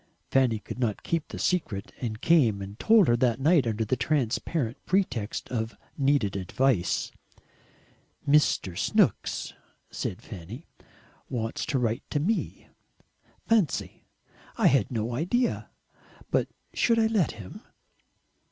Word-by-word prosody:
Fanny 130 -4 +3
could 105 - -8
not 115 -5 -1
keep 165 -2 -1
the - - -8
secret, 115 - -1
and 110 -3 -4
came 125 -12 +4
and 100 +3 -8
told 220 -6 +5
her 120 - +4
that 120 -2 +2
night 150 -2 +4
under 110 0 0
a 130 - +2
transparent 130 0 -1
pretext 125 - 0
of 115 -2 -3 0.2
needed 135 -8 +1
advice. 100 +1 0 1.2
"Mr. 140 - +3
Snooks," - - +1 0.4
said 90 - -4
Fanny, 105 - -9 0.6
"wants 115 -2 -3
to 140 - 0
write 120 +1 0
to 145 - 0
me. 210 +10 -2 0.8
Fancy! 215 -10 0 0.5
I - - +1
had 130 -6 +4
no 115 -1 -2
idea. 185 - 0 0.6
But - - +2 0.3
should 230 -1 +2
I 225 - +4
let 220 -7 +1
him?" 100 -4 -10
125 Hz, 125 wpm, -27 LUFS, 110-155 Hz, 1.2 s, told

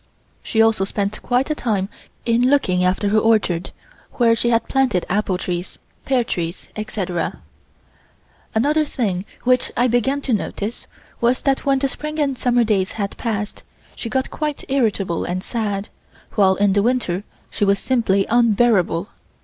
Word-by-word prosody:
She 225 -1 +2
also 225 -3 +3
spent 200 +1 -2
quite 255 +4 +1
a - - +3
time 210 -9 -1 0.4
in 240 +2 +3
looking 185 -11 +2
after 190 +3 +1
her 215 +1 +4
orchard, 210 -6 +2 0.4
where 230 -2 +4
she 235 +1 0
had 230 -1 +2
planted 260 -10 +1
apple 195 -1 +1
trees, 180 -1 -4 0.3
pear 260 -3 +2
trees, 170 -5 -4
etc. 190 -5 -3 1.2
Another 295 +7 +3
thing 205 -10 -2 0.2
which 255 0 +2
I 245 - +4
began 245 +4 +1
to 265 - -1
notice 210 +1 -3 0.3
was 240 +2 +1
that 275 0 0
when 275 -1 +4
the 275 +1 +1
spring 305 +3 -5
and 285 -3 +1
summer 245 -1 +2
days 200 -4 +1
had 200 -2 -3
passed, 210 -3 -3 0.3
she 230 - -5
got 260 +2 -1
quite 300 -2 -3
irritable 210 -10 0
and 185 +1 -3
sad, 210 -4 -2 0.4
while 190 -2 +4
in 200 0 +2
the 200 - +3
winter 210 -5 0 0.3
she - - -2
was 200 0 +4
simply 200 -5 +1
unbearable. 215 -6 +3
220 Hz, 155 wpm, -21 LUFS, 195-250 Hz, 1.2 s, her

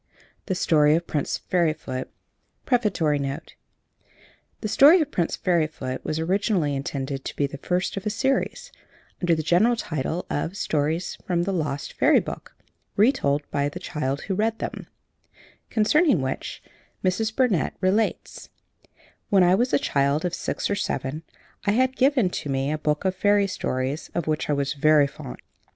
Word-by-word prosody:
THE 190 - 0
STORY 150 -3 +4
OF 170 +1 -1
PRINCE 145 -4 -2
FAIRYFOOT 155 -7 0 0.6
PREFATORY 205 - +1
NOTE 140 +3 -5 1.1
"THE 215 - -2
STORY 290 - +7
OF 305 -2 -1
PRINCE 170 -2 0
FAIRYFOOT" 155 -7 -1
was 155 - -2
originally 175 -3 0
intended 135 0 -4
to - - -6
be 145 - +1
the 140 0 -7
first 180 +5 -1
of 195 +2 -4
a - - +2
series, 270 - -1 0.5
under 175 -2 +3
the 155 - -3
general 190 +10 +3
title 160 - -3
of 165 +6 -3
"Stories 160 0 -1
from 175 -2 +1
the 195 +2 -1
Lost 150 -5 -3
Fairy - - +4
Book, - - -8 0.4
Re 215 +6 +5
told 145 - 0
by 145 0 0
the - - -8
Child 140 -2 -3
Who 195 - -3
Read 220 +3 0
Them," - - -6 0.8
concerning 270 - +3
which 130 0 -4 0.4
Mrs. 220 +4 0
Burnett 245 - +1
relates: 200 +4 -1 0.8
"When 195 -2 +5
I 180 +1 +5
was 240 +6 +2
a - - +4
child 140 - +1
of 175 - -2
six - - -2
or - - 0
seven, 145 -6 -3 0.4
I 205 - +3
had 260 +3 +2
given 260 -8 +3
to 145 - -7
me 135 +1 0
a 155 - -2
book 150 +3 -1
of 190 - +2
fairy 205 +1 +3
stories, 135 -6 -3
of 170 - -1
which 155 -1 -1
I - - +3
was 140 0 -1
very 150 0 +4
fond. 100 - -8
170 Hz, 165 wpm, -24 LUFS, 145-205 Hz, 1.1 s, STORY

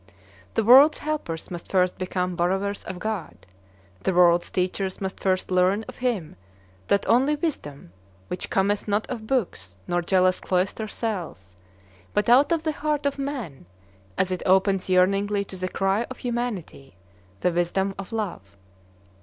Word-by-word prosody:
The 225 - +2
world's 270 +7 +8
helpers 290 - -4
must 175 -1 -7
first 185 -1 +2
become 180 -1 -2
borrowers 190 +3 -1
of 185 - -6
God. 210 -3 -5 0.6
The 190 - 0
world's 175 -1 +5
teachers 185 +1 -2
must 190 -1 -4
first 185 -1 0
learn 185 +4 +2
of - - -10
him 225 - -2 0.5
that 200 - +1
only 270 +5 +4
wisdom, 145 - -5 0.3
which 180 - -5
cometh 200 +2 +1
not 205 +1 +1
of 220 -2 -5
books 135 - -2
nor 175 0 +1
jealous 185 +1 +2
cloister 190 +4 -1
cells, 175 - -5 0.6
but 210 +2 +1
out 270 +7 +6
of 330 -2 +1
the 315 - 0
heart 300 -1 -2
of 280 0 -1
man 245 - -5 0.5
as 185 - +1
it 185 - -2
opens 190 0 +2
yearningly 200 +2 +2
to 190 - -8
the 185 0 -3
cry 195 +5 0
of 255 - -8
humanity, 235 - -4 0.5
the 180 - +2
Wisdom 175 +3 0
of 195 - -7
Love. 175 - -5
195 Hz, 155 wpm, -25 LUFS, 180-225 Hz, 0.6 s, world's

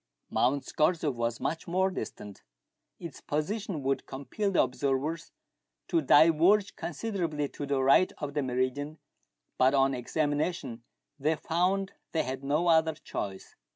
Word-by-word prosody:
Mount 135 +3 +1
Scorzef 155 -2 +1
was 115 -1 -2
much 165 +1 -3
more 190 +2 +1
distant; 105 - -7 0.6
its 170 -5 -8
position 175 +1 -3
would 135 +1 -1
compel 140 +10 -3
the 195 - +4
observers 135 +5 -2 0.6
to 335 - +2
diverge 175 - +5
considerably 170 -5 -3
to 145 - -6
the 135 -1 +1
right 140 +7 +5
of 145 -1 -5
the 145 - 0
meridian, 130 +4 -2 0.6
but 130 +2 +5
on 135 0 +3
examination 145 -1 -2 0.4
they 155 +3 +1
found 185 +5 0 0.2
they 160 - +1
had 130 +1 -5
no 150 +5 +1
other 160 -1 +4
choice. 95 -9 -6
150 Hz, 135 wpm, -29 LUFS, 135-170 Hz, 0.6 s, diverge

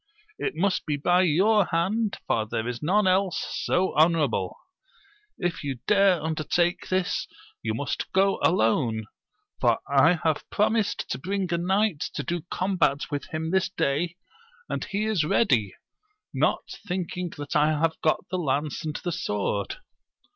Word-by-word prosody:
It - - -2
must 185 +2 0
be 150 -1 0
by 175 +5 +3
your 190 +5 +4
hand, 195 +6 0
for 110 -1 0
there 110 +1 -2
is 125 -1 -4
none 195 +6 +2
else 185 0 +2 0.2
so 185 +1 +1
honourable. 150 - +2 0.8
K 175 -3 +1
you 140 -2 -3
dare 195 -3 +4
undertake 160 +2 0
this, 185 -1 0 0.3
you 110 -1 -2
must 145 +4 -3
go 195 +1 +2
alone, 115 - +2 0.5
for - - +3
I 160 +5 +4
have 160 -2 0
pro 210 - +2
mised 220 -2 0
to - - -3
bring 190 +2 -2
a - - +2
knight 190 -1 +1 0.2
to - - -2
do 175 -1 -2
combat 180 -7 0
with 145 -1 -3
him 160 -1 -3
this 190 0 +2
day, 170 0 -1 0.5
and - - -3
he 210 +1 -2
is 215 -7 +1
ready, 125 - +2 0.6
not - - +1 0.2
thinking 180 -1 -3
that 145 -1 -5
I 150 0 +5
have 160 0 0
got 155 - +1
the 185 - -1
lance 145 -1 -1
and 155 -1 -4
the 175 - -1
sword. 105 -7 -2
170 Hz, 155 wpm, -26 LUFS, 145-190 Hz, 0.8 s, I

